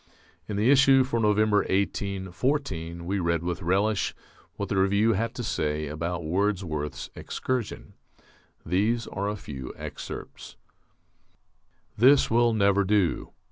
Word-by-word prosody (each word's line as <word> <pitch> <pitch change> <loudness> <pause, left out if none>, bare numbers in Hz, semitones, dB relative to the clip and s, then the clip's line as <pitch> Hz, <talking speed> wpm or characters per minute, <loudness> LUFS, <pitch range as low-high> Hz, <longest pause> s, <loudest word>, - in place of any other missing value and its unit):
In 105 - -4
the 110 +6 +4
issue 135 -1 +6
for 125 -2 -1
November, 105 -1 +3
1814, 95 - -1
we 100 +3 -1
read 85 -1 0
with 90 +1 -3
relish 95 +4 +1 0.4
what - - -4
the 100 - 0
Review 100 +4 +3
had 115 +3 -2
to 120 - -4
say 75 -6 -1
about 85 +3 -3
Wordsworth's 90 -4 -2
"Excursion." 125 -5 -4 0.7
These 105 +7 +1
are 100 +1 -3
a 105 - -2
few 65 -10 -7
excerpts: - - -8 1.4
This 130 +4 +5
will 120 +1 +4
never 100 -2 +3
do.... 100 -3 0
100 Hz, 125 wpm, -26 LUFS, 85-110 Hz, 1.4 s, issue